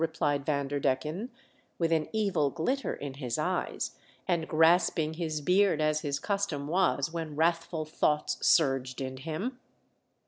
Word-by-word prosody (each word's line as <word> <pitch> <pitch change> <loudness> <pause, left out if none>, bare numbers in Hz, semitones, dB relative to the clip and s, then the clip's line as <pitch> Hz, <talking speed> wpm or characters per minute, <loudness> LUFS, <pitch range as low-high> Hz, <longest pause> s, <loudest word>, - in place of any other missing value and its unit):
replied 150 -3 0
Vanderdecken, 145 - -1 0.5
with 165 -1 0
an 160 -2 +2
evil 195 -10 +1
glitter 255 - -1
in 140 -2 -6
his 130 -4 -3
eyes, - - -1 0.4
and 165 -2 0
grasping 160 -1 +3
his 160 -2 -3
beard 185 +1 +3
as 155 0 +2
his 140 -2 -1
custom 195 -9 -2
was 160 -3 +1
when 160 -3 -4
wrathful 165 0 0
thoughts 150 -1 0
surged 135 -5 +3
in 130 -1 -4
him. 165 - -4
155 Hz, 135 wpm, -29 LUFS, 145-170 Hz, 0.5 s, grasping